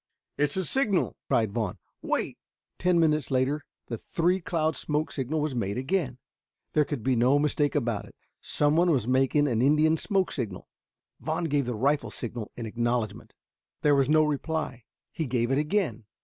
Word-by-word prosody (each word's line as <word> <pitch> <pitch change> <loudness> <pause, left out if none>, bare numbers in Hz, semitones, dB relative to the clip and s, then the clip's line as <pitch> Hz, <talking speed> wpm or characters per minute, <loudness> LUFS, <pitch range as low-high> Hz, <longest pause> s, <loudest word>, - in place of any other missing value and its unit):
"It's 145 +3 0
a 190 - 0
signal!" 215 - +1
cried 110 -3 +2
Vaughn. 105 -4 -2 0.2
"Wait!" - - -2 0.4
Ten 180 -1 +3
minutes 155 -2 +2
later 135 +3 +1 0.2
the 115 -2 -5
three 175 +3 +1
cloud 160 -2 0
smoke 150 +1 -1
signal 145 +3 -2
was 150 -2 -1
made 100 -3 -2
again. 130 -1 -1 0.6
There 150 -1 +4
could 140 -7 -4
be 130 -1 +2
no 125 +4 +4
mistake 145 0 +1
about 120 -7 0
it. - - -16 0.3
Someone 155 +4 +2
was 130 -8 +2
making 135 +3 +3
an 115 -4 +1
Indian 155 +4 +4
smoke 190 +2 0
signal. 110 -9 -4 0.5
Vaughn - - -2
gave 145 -5 0
the 125 - -2
rifle 140 +6 +1
signal 115 -2 -6
in 120 - -5
acknowledgment. 120 0 -2 0.5
There 150 - +5
was 135 -1 +3
no 155 0 +5
reply. 150 -4 -2 0.3
He 160 -4 -3
gave 120 0 0
it 135 - +3
again. 150 - -1
145 Hz, 170 wpm, -27 LUFS, 120-155 Hz, 0.6 s, There